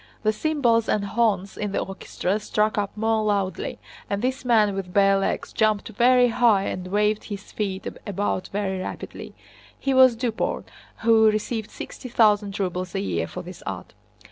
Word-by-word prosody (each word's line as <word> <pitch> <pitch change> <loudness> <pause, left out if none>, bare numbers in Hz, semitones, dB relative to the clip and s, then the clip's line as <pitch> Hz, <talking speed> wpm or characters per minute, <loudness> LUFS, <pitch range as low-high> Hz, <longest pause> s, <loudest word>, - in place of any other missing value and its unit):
The 215 0 +2
cymbals 235 -5 +1
and 205 -1 +1
horns 200 -3 0
in 205 -1 -3
the - - +1
orchestra 195 +1 -3
struck 215 0 0
up 205 0 -2
more 220 0 +1
loudly, 200 -3 -1 0.3
and 200 +2 -2
this 260 +1 -1
man 220 -5 +3
with 195 -2 -5
bare 195 0 +4
legs 195 - -2
jumped 215 0 +1
very 245 +3 +4
high 225 -4 +3
and 185 -2 -4
waved 210 +2 +1
his 200 -2 -8
feet 195 -2 -3 0.2
about 200 -1 -1
very 195 -2 -2
rapidly. 185 - -7 0.4
(He 275 - -1
was 260 -2 +7
Duport, 230 -1 -2 0.4
who 220 -1 +6
received 215 +1 -2
sixty 255 - -8
thousand 210 -3 +3
rubles 185 -1 -3
a - - +1
year 85 -4 -1
for - - -7
this - - -10
art.) - - -6
210 Hz, 170 wpm, -24 LUFS, 195-225 Hz, 0.4 s, was